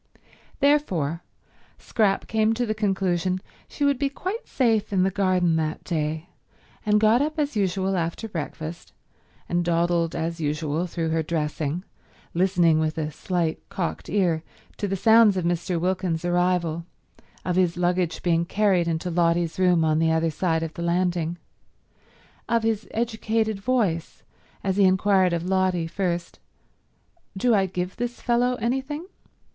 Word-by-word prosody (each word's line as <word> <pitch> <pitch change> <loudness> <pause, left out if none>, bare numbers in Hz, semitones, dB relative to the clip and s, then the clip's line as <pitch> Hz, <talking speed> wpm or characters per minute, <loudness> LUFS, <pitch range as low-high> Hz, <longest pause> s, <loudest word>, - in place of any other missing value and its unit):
Therefore 180 - +2 0.6
Scrap 205 -4 0
came 220 +1 +2
to 245 +1 0
the 215 - -1
conclusion 190 -3 0 0.3
she 290 - -2
would 280 -2 +2
be 280 - +1
quite 375 - -5
safe 225 -5 +1
in 190 -2 +2
the 190 - +2
garden 185 -4 +2
that 155 -1 -2
day, 160 -1 -2 0.6
and 210 0 +3
got 220 +4 +4
up 305 +2 -1
as 295 -4 -1
usual 195 -1 0
after 170 +5 -2
breakfast, 165 -2 -6 0.5
and 175 0 0
dawdled 170 0 +1
as 165 0 -3
usual 155 +3 -1
through 165 -1 -2
her 160 0 +1
dressing, 155 +1 -2 0.5
listening 175 -3 +3
with 155 0 -1
a 155 -1 -2
slight 170 +1 -2
cocked 195 -4 -4
ear 175 -5 +1 0.4
to 205 - -2
the 195 - -1
sounds 220 0 +5
of 180 - -1
Mr. 175 0 0
Wilkins's 180 -2 -1
arrival, 175 -2 +1 0.6
of 180 - 0
his 180 -2 +2
luggage 180 -1 0
being 170 -1 +2
carried 190 -1 +2
into 165 +2 -2
Lotty's 170 0 +1
room 180 -3 +4
on 155 0 +2
the 165 0 +3
other 160 0 +1
side 165 0 0
of 160 -1 -5
the 170 - -7
landing, 175 -1 0 1.1
of 230 -1 +2
his 225 -1 -1
educated 220 -2 -1
voice 195 -8 -1 0.4
as 190 -1 0
he 200 - +5
inquired 190 0 +4
of 170 0 -2
Lotty, 185 -2 +1
first, 170 0 -3 1.0
"Do 240 +4 +3
I 195 -3 +3
give 180 0 -4
this 240 0 -3
fellow 245 +1 +1
anything?" 265 +7 -2
180 Hz, 150 wpm, -25 LUFS, 165-210 Hz, 1.1 s, sounds